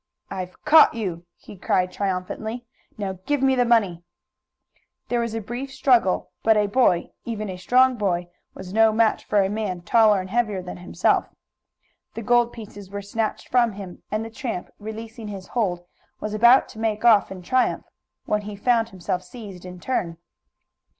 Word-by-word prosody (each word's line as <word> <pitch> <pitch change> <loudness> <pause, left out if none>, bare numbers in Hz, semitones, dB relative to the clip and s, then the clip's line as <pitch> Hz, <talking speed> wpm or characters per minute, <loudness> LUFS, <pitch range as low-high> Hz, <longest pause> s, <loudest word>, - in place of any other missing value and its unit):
"I've 185 +3 -7
caught 305 -4 +7
you!" 175 -6 -4
he - - -13
cried 185 -1 0
triumphantly. 200 +5 -3 0.3
"Now 190 -3 -4
give 290 -2 +1
me 265 0 +4
the 250 -1 +2
money!" 200 -8 +2 1.1
There 240 - +1
was 230 -1 -2
a 225 - -2
brief 245 +6 -6
struggle, 250 -8 +2
but 220 -1 +4
a 210 - +3
boy, 200 -5 +2
even 215 -3 -4
a 180 - -7
strong 250 +6 +3
boy, 180 -4 -1 0.3
was 190 0 -9
no 225 0 +5
match 220 0 +2
for 205 -2 +3
a - - +1
man 200 -3 -3
taller 215 -1 +4
and 185 0 -7
heavier 215 -5 0
than 180 - -7
himself. 175 +1 0 0.9
The 230 - -5
gold 240 +1 +3
pieces 205 -4 -10
were 200 0 -6
snatched 215 +2 -3
from 240 -3 +3
him, 190 -3 -9
and 215 +1 -2
the 225 - -8
tramp, 225 -5 -5
releasing 220 +1 -8
his 195 -2 -8
hold, 180 -7 -1 0.3
was 215 - -4
about 235 +4 +6
to 220 - -11
make 220 0 -1
off 220 -5 +5
in 185 -2 -8
triumph 255 +7 +1 0.4
when 210 0 0
he 205 0 -7
found 230 +2 +1
himself 185 -1 -3
seized 190 -2 -11
in 180 0 -9
turn. 175 -8 -2
215 Hz, 175 wpm, -23 LUFS, 185-235 Hz, 1.1 s, caught